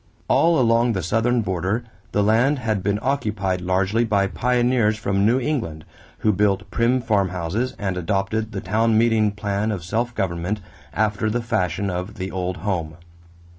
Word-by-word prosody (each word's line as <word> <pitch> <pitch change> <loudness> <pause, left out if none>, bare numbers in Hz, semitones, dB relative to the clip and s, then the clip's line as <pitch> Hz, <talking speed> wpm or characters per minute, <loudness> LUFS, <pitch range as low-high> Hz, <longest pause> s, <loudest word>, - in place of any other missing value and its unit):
All 165 -1 +4
along 115 -1 +3
the 95 -4 -2
southern 115 +6 +1
border 95 +3 -1 0.3
the 105 - +2
land 115 +8 +3
had 110 -5 -1
been 100 +2 0
occupied 105 -9 -1
largely 95 +5 +1
by 100 -3 +2
pioneers 120 0 +1
from 100 -1 +1
New 125 +3 +3
England, 115 - -3 0.4
who 110 - +6
built 100 0 0
prim 125 +2 +2
farmhouses 100 +2 -1
and 95 -3 -2
adopted 100 +5 -1
the 100 -3 -4
town 110 0 +2
meeting 110 -2 +3
plan 100 +1 -2
of 95 -5 -4
self 115 +7 -2
government 90 +3 -2 0.3
after 110 0 0
the 120 +2 -1
fashion 100 -4 -1
of 90 +3 -4
the 95 0 -5
old 90 -1 -3
home. 85 -6 -2
105 Hz, 160 wpm, -22 LUFS, 95-115 Hz, 0.4 s, who